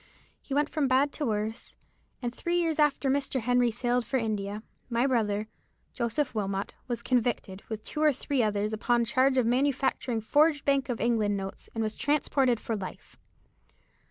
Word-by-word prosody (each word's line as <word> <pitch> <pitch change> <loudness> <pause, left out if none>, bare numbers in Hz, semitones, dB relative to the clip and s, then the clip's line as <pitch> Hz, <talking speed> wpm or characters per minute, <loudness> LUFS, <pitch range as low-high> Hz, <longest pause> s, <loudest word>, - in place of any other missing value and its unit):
He 275 - -5
went 295 +1 +3
from 305 -2 0
bad 265 +3 +3
to 295 -2 -3
worse, 215 +1 -3 0.5
and 240 0 -2
three 345 +6 -1
years 325 -2 0
after 295 -2 +3
Mr. 270 0 0
Henry 245 +1 +3
sailed 245 +1 0
for 265 - -1
India, 210 -2 -2 0.3
my 235 +1 +2
brother, 215 -5 +1 0.5
Joseph 250 +4 -1
Wilmot, 195 -2 -2
was 235 -2 -3
convicted, 235 -6 0
with 220 -1 -5
two 305 - -4
or 305 -1 +6
three 275 0 -1
others, 210 -1 0
upon 235 +2 +2
a - - -2
charge 260 +3 +2
of 255 - +3
manufacturing 260 -1 +1
forged 295 +5 +3
Bank 275 -1 +2
of 240 - -2
England 220 -4 +1
notes, 195 0 -7
and 225 - 0
was 215 0 -2
transported 270 -4 +1
for 225 - -3
life." 190 -3 -8
245 Hz, 175 wpm, -28 LUFS, 220-275 Hz, 0.5 s, or